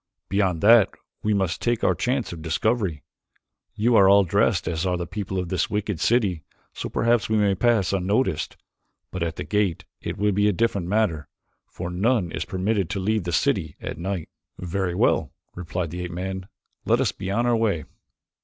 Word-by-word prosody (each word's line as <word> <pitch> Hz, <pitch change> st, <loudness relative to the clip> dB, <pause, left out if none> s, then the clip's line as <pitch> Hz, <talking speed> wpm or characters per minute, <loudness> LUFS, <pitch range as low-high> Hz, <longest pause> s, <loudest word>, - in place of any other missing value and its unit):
Beyond 95 Hz, -4 st, +1 dB
that 115 Hz, 0 st, +7 dB, 0.3 s
we 105 Hz, -, 0 dB
must 95 Hz, -3 st, -1 dB
take 120 Hz, -1 st, 0 dB
our -, -, +4 dB
chance 125 Hz, -6 st, -1 dB
of 80 Hz, -, -8 dB
discovery. 95 Hz, -, -1 dB, 0.7 s
You 115 Hz, +3 st, +2 dB
are 95 Hz, -2 st, +7 dB
all 100 Hz, 0 st, +7 dB
dressed 90 Hz, -, +1 dB
as 80 Hz, 0 st, -1 dB
are 90 Hz, -1 st, 0 dB
the 85 Hz, -, -3 dB
people 95 Hz, +1 st, -4 dB
of 90 Hz, -2 st, -2 dB
this 90 Hz, -2 st, 0 dB
wicked 105 Hz, -4 st, -2 dB
city 100 Hz, -9 st, +1 dB, 0.3 s
so -, -, -5 dB
perhaps 115 Hz, -2 st, +1 dB
we 110 Hz, -, +2 dB
may 100 Hz, -2 st, +3 dB
pass 105 Hz, -2 st, +2 dB
unnoticed, 95 Hz, -, 0 dB, 0.5 s
but 90 Hz, -, -5 dB
at 85 Hz, -1 st, -1 dB
the -, -, -5 dB
gate 105 Hz, -5 st, 0 dB, 0.2 s
it -, -, -4 dB
will 105 Hz, +1 st, +2 dB
be 105 Hz, +1 st, +2 dB
a 105 Hz, -, +3 dB
different 100 Hz, -3 st, 0 dB
matter, 95 Hz, -8 st, 0 dB, 0.4 s
for 85 Hz, 0 st, -6 dB
none 95 Hz, 0 st, +1 dB
is -, -, -3 dB
permitted 95 Hz, 0 st, -1 dB
to 100 Hz, -, -2 dB
leave 105 Hz, 0 st, 0 dB
the 85 Hz, -, -2 dB
city 80 Hz, -1 st, 0 dB
at -, -, -6 dB
night." 95 Hz, -1 st, -3 dB, 0.3 s
"Very 90 Hz, 0 st, -2 dB
well," -, -, +2 dB, 0.2 s
replied 90 Hz, -1 st, -4 dB
the 90 Hz, +1 st, -5 dB
ape 90 Hz, -, -4 dB
man, 95 Hz, +2 st, -4 dB, 0.4 s
"let -, -, +2 dB
us -, -, +2 dB
be 95 Hz, 0 st, -6 dB
on 115 Hz, +5 st, +1 dB
our 120 Hz, -1 st, +3 dB
way." 105 Hz, -9 st, 0 dB
95 Hz, 190 wpm, -24 LUFS, 90-105 Hz, 0.7 s, that